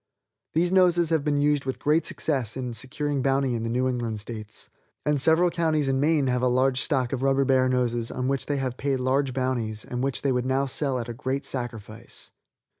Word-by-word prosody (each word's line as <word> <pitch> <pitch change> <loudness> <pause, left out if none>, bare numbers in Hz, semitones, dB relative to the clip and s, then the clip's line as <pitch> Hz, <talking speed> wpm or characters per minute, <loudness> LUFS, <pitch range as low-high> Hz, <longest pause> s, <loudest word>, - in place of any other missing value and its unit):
These 175 +2 +2
noses 175 -3 +4
have 160 -3 +2
been 145 -1 +1
used 145 -1 +2
with 130 - -3
great 155 +3 +1
success 130 -7 -1
in 125 -2 -4
securing 140 +3 -3
bounty 135 -1 +1
in 115 - -2
the 115 - -2
New 125 +2 +1
England 120 -4 -2
states, 105 -1 -8 0.3
and 150 -2 +1
several 165 +4 +4
counties 155 -4 +1
in 135 0 +1
Maine 150 0 +2
have 125 -1 0
a 125 - +2
large 130 +1 +2
stock 130 -5 0
of 130 - -2
rubber 135 0 +2
bear 130 -1 +3
noses 120 -2 0
on 125 0 -3
which 135 0 -1
they 145 - 0
have 130 -2 -3
paid 135 -1 -1
large 130 +1 +1
bounties, 120 -4 -2
and 125 0 -4
which 135 -1 -2
they 140 - +2
would 125 0 0
now 135 +1 +1
sell 135 0 0
at 120 - -4
a 120 - -5
great 130 +3 -3
sacrifice. 120 -3 -6
130 Hz, 215 wpm, -25 LUFS, 125-145 Hz, 0.3 s, noses